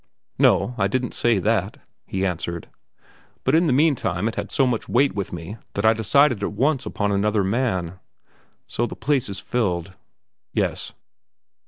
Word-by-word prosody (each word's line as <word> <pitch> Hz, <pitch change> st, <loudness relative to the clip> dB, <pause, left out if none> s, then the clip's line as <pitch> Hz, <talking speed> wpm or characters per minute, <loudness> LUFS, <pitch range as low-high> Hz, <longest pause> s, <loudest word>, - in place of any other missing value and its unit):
"No, 125 Hz, -, +4 dB
I 95 Hz, -, +3 dB
didn't 125 Hz, +4 st, -2 dB
say 120 Hz, -3 st, +2 dB
that," 105 Hz, +4 st, 0 dB, 0.3 s
he 95 Hz, 0 st, -1 dB
answered, 85 Hz, -2 st, -3 dB, 0.8 s
"but 130 Hz, -, +1 dB
in 165 Hz, +2 st, +4 dB
the -, -, +2 dB
meantime 125 Hz, -, +2 dB
it 115 Hz, -, -2 dB
had -, -, -4 dB
so 135 Hz, -, +3 dB
much 120 Hz, -3 st, -1 dB
weight 135 Hz, +3 st, +3 dB
with 100 Hz, -1 st, -4 dB
me 85 Hz, +5 st, -7 dB, 0.2 s
that 100 Hz, -, -1 dB
I 110 Hz, -, +6 dB
decided 120 Hz, +2 st, +3 dB
at 100 Hz, -, -2 dB
once 135 Hz, +5 st, +1 dB
upon 105 Hz, -1 st, -1 dB
another 105 Hz, +1 st, +1 dB
man." 95 Hz, -5 st, -1 dB, 0.7 s
"So 120 Hz, -, -1 dB
the -, -, -7 dB
place 140 Hz, -6 st, 0 dB
is 100 Hz, -, -5 dB
filled?" 95 Hz, -6 st, -2 dB, 0.6 s
"Yes." -, -, -1 dB
110 Hz, 165 wpm, -23 LUFS, 95-130 Hz, 0.8 s, I